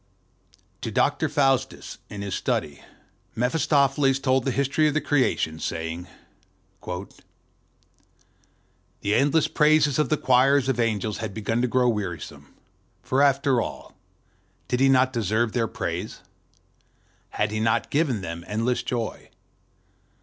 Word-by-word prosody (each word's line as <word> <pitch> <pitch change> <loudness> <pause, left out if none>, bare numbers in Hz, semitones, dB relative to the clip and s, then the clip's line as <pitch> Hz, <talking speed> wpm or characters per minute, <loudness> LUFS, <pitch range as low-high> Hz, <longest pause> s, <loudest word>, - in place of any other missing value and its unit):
TO - - -3
Dr. - - +1
Faustus 135 -3 0
in 100 -1 -6
his 100 -2 -4
study 75 -5 -2 0.5
Mephistopheles 135 +1 +2
told 130 -2 +1
the - - +1
history 140 +4 +1
of 150 - -1
the - - +3
Creation, 130 - 0
saying:"The 90 +2 -8 2.0
endless 145 +6 +3
praises 150 -2 +3
of 150 - +1
the 155 - +2
choirs 135 +1 +3
of 130 -3 0
angels 110 -2 -1
had 110 -3 -5
begun 115 +2 -1
to 125 - +1
grow 125 +1 +2
wearisome; 100 -7 -4 0.5
for, 130 +2 +1
after 135 -3 +3
all, - - -7 0.7
did 125 - -1
he 135 0 +4
not 130 0 +3
deserve 110 0 0
their 115 -1 0
praise? 90 +1 -5 1.1
Had 105 0 -1
he 110 - -2
not 110 0 0
given 140 -8 +1
them 85 -1 -6
endless 115 +4 -1
joy? 120 -3 -4
125 Hz, 125 wpm, -24 LUFS, 105-135 Hz, 2.0 s, he